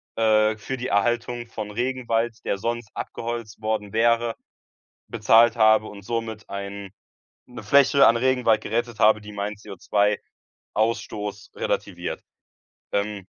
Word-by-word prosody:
äh, 110 -1 +3
für 130 +5 -5
die 125 +1 -4
Erhaltung 120 +3 0
von 110 -2 -6
Regenwald, 120 -1 -1
der - - 0
sonst 115 +1 -3
abgeholzt 115 -2 -6
worden 110 -2 -2
wäre, 115 +1 +2 0.7
bezahlt 115 +1 +4
habe 110 -1 +5
und 100 -1 -10
somit 115 -1 -4
ein 100 0 -6 0.6
'ne 125 -2 -10
Fläche 140 +5 +5
an 115 - +5
Regenwald 125 -3 +2
gerettet 120 +1 -2
habe, 105 0 +5
die 105 0 -10
meinen 105 +1 -4 1.0
CO2-Ausstoß 105 -2 -3
relativiert. - - -3 0.7
Ähm 100 -1 -2
110 Hz, 120 wpm, -24 LUFS, 105-120 Hz, 1.0 s, habe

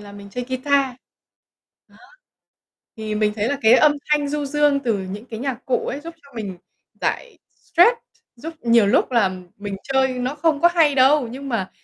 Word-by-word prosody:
là 205 -1 -12
mình 200 0 -11
chơi 245 +4 -4
guitar. 265 0 0 0.9
Đó. - - -23 1.0
Thì 215 -1 -4
mình 210 0 +1
thấy 215 +3 0
là 285 - -2
cái 220 +1 +6
âm 295 +3 +5 0.2
thanh 295 -1 +2
du 295 0 -2
dương 295 0 +2
từ 225 -4 +1
những 195 +4 -7
cái 225 -2 -8
nhạc 265 -2 -4
cụ 255 - 0
ấy 280 - -4
giúp 335 +2 -9
cho 280 - -20
mình 195 -5 -5 0.4
giải - - -3
stress, 360 +8 +3 0.4
giúp 325 +7 -8
nhiều 230 -3 +4
lúc 200 - +2
là 220 -6 +3 0.3
mình 205 -1 -5
chơi 265 -1 +2
nó 250 +3 -2
không 300 -1 0
có 345 - +6
hay 305 -4 +4
đâu, 265 -1 +4
nhưng 275 +3 -8
mà 220 -7 -2
260 Hz, 195 wpm, -21 LUFS, 220-290 Hz, 1.0 s, cái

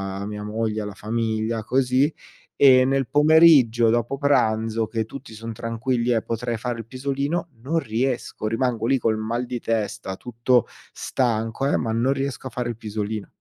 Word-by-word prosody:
a 100 - -5
mia 105 0 -6
moglie, 110 0 -2
alla 105 -1 -5
famiglia, 110 +1 -2
così, 130 +4 +2 0.5
e 130 -2 +8
nel 135 -1 +1
pomeriggio 145 -7 +5
dopo 120 +4 0
pranzo 115 -5 +1
che 110 -2 -2
tutti 135 -1 -10
son 115 +1 -7
tranquilli 115 +2 -1
e 115 -2 +2
potrei 115 0 -3
fare 120 0 -4
il 115 - -7
pisolino 140 +7 -2
non 160 +6 0
riesco, 120 -2 -2
rimango 115 0 -1
lì 135 - +3
col 115 -3 +1
mal 115 +3 -2
di 120 -1 -5
testa 105 -4 -2
tutto 120 0 +1 0.2
stanco, 115 +1 -1
eh, - - +2
ma 110 -2 -2
non 120 +4 +1
riesco 135 -1 -3
a - - -6
fare 125 0 -3
il 120 - -4
pisolino. 105 -1 -4
115 Hz, 170 wpm, -23 LUFS, 110-130 Hz, 0.5 s, e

